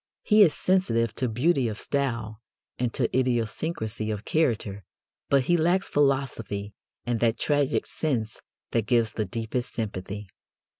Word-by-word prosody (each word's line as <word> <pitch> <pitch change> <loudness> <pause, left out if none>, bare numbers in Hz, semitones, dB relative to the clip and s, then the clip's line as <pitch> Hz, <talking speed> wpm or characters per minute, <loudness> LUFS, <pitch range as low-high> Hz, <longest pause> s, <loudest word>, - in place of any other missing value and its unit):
He 215 0 +5
is 175 -7 +6
sensitive 115 - +1
to 125 - -1
beauty 130 +3 +2
of 110 -1 -4
style 115 -6 -2 0.4
and 125 -1 0
to - - 0
idiosyncrasy 115 -2 -1
of 105 0 -4
character, 110 -10 0 0.5
but 140 -2 +4
he 175 +7 +3
lacks 175 +4 +2
philosophy 130 -8 0 0.3
and 120 -1 0
that 115 -1 +2
tragic 145 -1 +1
sense 120 -8 -2 0.3
that 115 -3 0
gives 115 -2 +3
the 110 - -1
deepest 115 +5 -4
sympathy. 105 -2 -4
120 Hz, 140 wpm, -26 LUFS, 110-140 Hz, 0.5 s, is